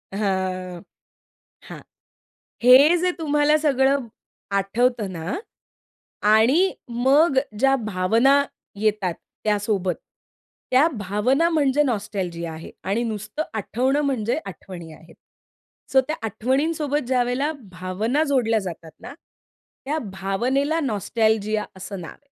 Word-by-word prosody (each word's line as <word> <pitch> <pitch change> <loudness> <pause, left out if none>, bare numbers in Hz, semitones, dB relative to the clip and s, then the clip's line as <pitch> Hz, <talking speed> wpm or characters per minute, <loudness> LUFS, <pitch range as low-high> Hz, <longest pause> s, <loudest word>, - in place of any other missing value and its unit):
हां 185 -3 -2 0.9
हां. - - -8 0.8
हे 275 +7 +7
जे 360 +1 +1
तुम्हाला 295 0 +3
सगळं 275 -3 +2 0.5
आठवतं 215 +1 +1
ना, 165 +1 -4 0.9
आणि 235 - +4 0.2
मग 265 +5 +3 0.2
ज्या 270 0 +4
भावना 230 +5 +2 0.4
येतात 210 -5 0 0.3
त्यासोबत. 205 -4 0 0.8
त्या 270 +6 +5
भावना 225 - +1
म्हणजे 295 -3 +2
नॉस्टॅल्जिया 185 - -3
आहे. 160 +1 -9
आणि 200 +7 0
नुसतं 215 +6 -4
आठवणं 255 +7 0
म्हणजे 240 -2 0
आठवणी 175 -4 -9
आहेत. 165 +1 -17 0.8
सो 265 - +5
त्या 310 - -1
आठवणींसोबत 280 +5 -1
ज्यावेळेला 255 +3 +1 0.2
भावना 195 - -1
जोडल्या 230 -5 +2
जातात 170 -4 -7
ना 260 - -9 0.7
त्या 305 +3 -1 0.2
भावनेला 260 +11 0
नॉस्टॅल्जिया 215 - 0
असं 190 0 -7
नाव 165 - -8
आहे. - - -19
230 Hz, 105 wpm, -23 LUFS, 195-275 Hz, 0.9 s, हे